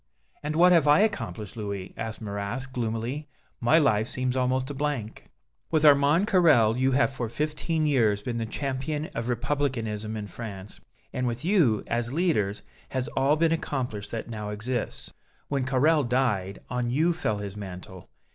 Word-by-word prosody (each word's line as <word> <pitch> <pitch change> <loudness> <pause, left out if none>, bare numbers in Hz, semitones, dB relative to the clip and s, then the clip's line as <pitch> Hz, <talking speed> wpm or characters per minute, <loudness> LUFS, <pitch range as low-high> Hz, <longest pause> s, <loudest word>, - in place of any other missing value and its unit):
"And 150 +1 -3
what 180 +2 +6
have 165 -4 +5
I 145 +4 +6
accomplished, 160 - -2
Louis?" 100 -4 -5
asked 110 0 -5
Marrast, 105 +5 -4
gloomily. 120 +5 -3 0.3
"My 120 +7 +4
life 110 -8 +3
seems 125 0 -1
almost 130 +1 0
a - - -4
blank." 135 -6 -3 0.4
"With 155 -2 +2
Armand 145 +5 +5
Carrel, 155 - +5
you 130 +1 +2
have 135 0 +2
for 120 -3 -3
fifteen 155 +4 -1
years 110 -8 +2
been 120 0 -3
the 115 -1 -2
champion 140 +5 -3
of 115 +1 -3
Republicanism 115 -4 -1
in 105 - -4
France, 105 -2 -8 0.3
and 125 0 -1
with 120 +5 -3
you, 165 - +3
as 120 0 -1
leaders, 105 - 0 0.3
has 130 -1 -2
all 135 +3 +2
been 165 +1 +2
accomplished 130 -10 -2
that 115 - -5
now 105 -3 -5
exists. 110 +4 -4 0.4
When 140 -3 0
Carrel 145 +4 +3
died, 120 -7 0
on 125 -1 -2
you 160 +7 +2
fell 160 -11 -1
his 100 -1 -6
mantle. 95 -2 -9
125 Hz, 165 wpm, -27 LUFS, 110-145 Hz, 0.4 s, what